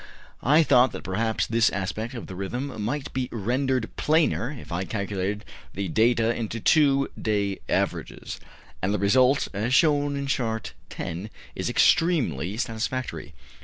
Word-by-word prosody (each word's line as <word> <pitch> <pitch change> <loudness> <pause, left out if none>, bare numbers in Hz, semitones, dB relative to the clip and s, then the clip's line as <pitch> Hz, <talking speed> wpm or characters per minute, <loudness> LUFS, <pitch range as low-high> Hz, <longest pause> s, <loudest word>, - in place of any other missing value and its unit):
I 150 +5 +5
thought 130 -2 +4
that - - -6
perhaps 110 +4 0
this 115 0 +3
aspect 100 +6 -4
of 115 - -6
the - - -8
rhythm 115 +5 -4
might 135 +7 -3
be 130 -1 -2
rendered 125 +2 0
plainer 155 -6 +2
if 140 -9 -9
I 85 +2 -1
calculated 100 0 -3 0.3
the 100 -2 -2
data 115 +3 +3
into 115 0 -3
two 140 +1 +3
day 100 -2 0
averages; - - -2 0.4
and 100 +3 +1
the - - +1
result, 125 +7 +3
as 115 +6 0
shown 145 -3 +3
in 140 0 -3
Chart 115 -5 -2 0.2
10, 85 +5 -5 0.2
is - - -3
extremely 105 - +2
satisfactory. 115 - -3
115 Hz, 145 wpm, -25 LUFS, 100-130 Hz, 0.4 s, I